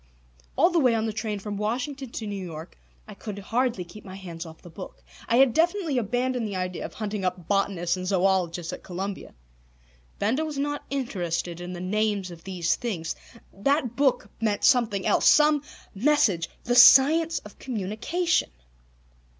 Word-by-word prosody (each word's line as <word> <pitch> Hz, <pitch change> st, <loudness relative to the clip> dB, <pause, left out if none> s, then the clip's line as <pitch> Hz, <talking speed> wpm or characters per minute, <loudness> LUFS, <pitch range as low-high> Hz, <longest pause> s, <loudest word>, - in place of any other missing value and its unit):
All 365 Hz, -, +4 dB
the 345 Hz, -, +3 dB
way 250 Hz, -6 st, +4 dB
on 220 Hz, 0 st, 0 dB
the 220 Hz, -, -2 dB
train 215 Hz, -1 st, -3 dB
from 205 Hz, 0 st, -5 dB
Washington 255 Hz, +6 st, -3 dB
to 230 Hz, -, -6 dB
New 200 Hz, -2 st, -4 dB
York 160 Hz, -2 st, -8 dB, 0.3 s
I -, -, -9 dB
could 210 Hz, -2 st, -7 dB
hardly, 230 Hz, 0 st, -1 dB
keep 175 Hz, +5 st, -13 dB
my 190 Hz, -1 st, -9 dB
hands 175 Hz, -3 st, -8 dB
off 160 Hz, 0 st, -13 dB
the 175 Hz, -, -11 dB
book. 185 Hz, +3 st, -10 dB, 0.3 s
I 230 Hz, -, +3 dB
had 260 Hz, -1 st, +5 dB
definitely 335 Hz, -4 st, +1 dB
abandoned 245 Hz, +1 st, -1 dB
the 200 Hz, -, -5 dB
idea 185 Hz, -1 st, -3 dB
of -, -, -9 dB
hunting 210 Hz, -2 st, -4 dB
up 180 Hz, -2 st, -3 dB
botanists 190 Hz, -3 st, 0 dB
and 185 Hz, 0 st, -5 dB
zoologists 180 Hz, -3 st, +1 dB
at -, -, -7 dB
Columbia. 190 Hz, +2 st, -6 dB, 0.8 s
Benda 240 Hz, +10 st, 0 dB
was 305 Hz, -2 st, -4 dB
not 290 Hz, +1 st, -2 dB
interested 175 Hz, -10 st, -3 dB
in 180 Hz, +1 st, -6 dB
the 175 Hz, -, -6 dB
names 205 Hz, 0 st, -1 dB
of 165 Hz, -1 st, -12 dB
these 180 Hz, -3 st, 0 dB
things. 175 Hz, -9 st, -3 dB, 0.4 s
That 250 Hz, +3 st, 0 dB
book 275 Hz, -2 st, +1 dB
meant 210 Hz, -2 st, 0 dB
something 230 Hz, -7 st, +3 dB
else. -, -, +3 dB
Some 300 Hz, -1 st, +5 dB, 0.3 s
message. 205 Hz, -, +2 dB
The 245 Hz, -, 0 dB
Science 315 Hz, +6 st, +7 dB
of 210 Hz, -, -10 dB
Communication! 255 Hz, -, -1 dB
210 Hz, 170 wpm, -26 LUFS, 185-260 Hz, 0.8 s, Science